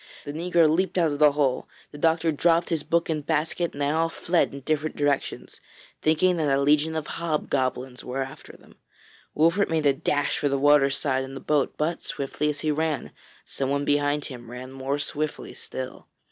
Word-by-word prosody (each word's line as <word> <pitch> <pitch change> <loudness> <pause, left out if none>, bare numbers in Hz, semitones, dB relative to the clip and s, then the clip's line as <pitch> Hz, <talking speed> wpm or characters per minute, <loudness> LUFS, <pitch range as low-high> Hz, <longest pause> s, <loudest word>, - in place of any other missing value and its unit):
The 145 - -5
negro 170 0 +3
leaped 185 +5 +1
out 165 -3 +3
of 145 - -4
the 150 -1 +6
hole, 140 -3 0 0.2
the 145 - -10
doctor 165 +1 +2
dropped 165 +3 +2
his 165 -3 0
book 170 +3 +1
and 155 -2 -2
basket, 160 +3 -1
and 145 - -9
they 140 - +1
all 165 +1 +1
fled 170 +1 +1
in 140 - -8
different 155 +2 -1
directions, 145 -2 -2 0.4
thinking 165 +3 +3
that 145 -4 +2
a - - +1
legion 150 +3 +2
of 155 -2 -2
hobgoblins 135 -6 -2
were 135 +2 -2
after 135 0 -11
them. - - -21 0.6
Wolfert 170 +6 +3
made 160 -2 0
a 140 - +5
dash 145 +1 0
for 145 - +1
the 140 - +1
water 145 0 +5
side 135 -1 -1
and 135 +1 -8
the - - -6
boat, 145 0 0
but, 160 +3 -1
swiftly 140 +2 -2
as 145 -1 -3
he 155 - +1
ran, 155 -1 -1 0.3
someone 140 +1 -2
behind 145 0 +1
him 120 -3 -9
ran 125 +2 -8
more 135 +1 -2
swiftly 150 +1 -4
still. 130 -1 -7
150 Hz, 195 wpm, -25 LUFS, 140-160 Hz, 0.6 s, the